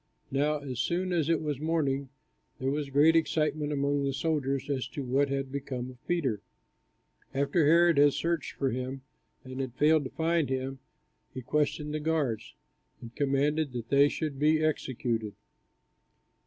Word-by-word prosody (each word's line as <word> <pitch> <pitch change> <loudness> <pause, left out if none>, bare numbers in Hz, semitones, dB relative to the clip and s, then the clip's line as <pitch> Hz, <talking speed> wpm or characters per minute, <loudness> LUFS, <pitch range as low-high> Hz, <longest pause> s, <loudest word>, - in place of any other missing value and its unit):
Now 145 +3 +1
as 130 -4 -5
soon 180 +5 0
as 165 -3 +1
it 165 -2 +2
was 145 -3 -2
morning, 140 -4 0 0.5
there 130 +1 -1
was 145 -1 -2
great 150 +4 +5
excitement 155 -2 +1
among 140 0 0
the 135 -1 0
soldiers, 140 -3 -1
as 135 -3 -2
to 140 +1 -6
what 135 +3 +1
had 135 -1 -2
become 130 -2 -4
of 125 0 -20
Peter. 135 - 0 0.9
After 140 +3 +2
Herod 170 -1 +5
had 145 -1 +6
searched 165 +1 -1
for 135 -2 -1
him, 130 +2 -4 0.4
and 130 0 -8
had 130 -2 -5
failed 150 +1 +4
to - - -4
find 165 -2 0
him, 130 0 -3 0.6
he 130 - -5
questioned 150 +2 -1
the 155 - -1
guards, 150 -8 -1 0.4
and 115 0 -11
commanded 145 +1 +1
that 120 -1 -5
they 140 +1 +5
should 150 -4 -4
be 155 +1 +3
executed. 120 -7 -1
140 Hz, 160 wpm, -29 LUFS, 130-155 Hz, 0.9 s, had